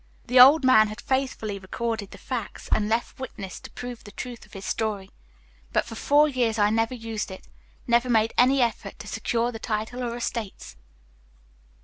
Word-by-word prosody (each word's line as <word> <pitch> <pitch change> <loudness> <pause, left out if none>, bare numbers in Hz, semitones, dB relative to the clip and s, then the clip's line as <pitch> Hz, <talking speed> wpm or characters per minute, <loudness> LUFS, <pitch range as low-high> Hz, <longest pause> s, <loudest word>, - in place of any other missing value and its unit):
The 250 +1 +4
old 275 +4 +9
man 220 -4 +6
had 215 +2 -8
faithfully 255 -7 -2
recorded 220 +2 -3
the - - -12
facts 240 -5 -5
and 210 -1 +2
left 230 +4 -1
witnesses 195 -8 -7
to - - -11
prove 245 -1 -7
the 205 - -11
truth 240 +3 -8
of - - -24
his 195 -1 -8
story; 205 -3 -2 0.6
but - - +1
for - - -9
four 290 +6 +4
years 245 -5 0
I 205 0 +3
never 225 +3 +1
used 225 -3 -4
it, 190 - -10 0.4
never 240 +1 +2
made 225 -1 +3
any 255 +1 +5
effort 235 -2 -3
to - - -10
secure 235 +1 -1
the 225 - -7
title 220 +3 -3
or 235 -1 -3
estates." 230 -4 -5
230 Hz, 185 wpm, -25 LUFS, 215-250 Hz, 0.6 s, old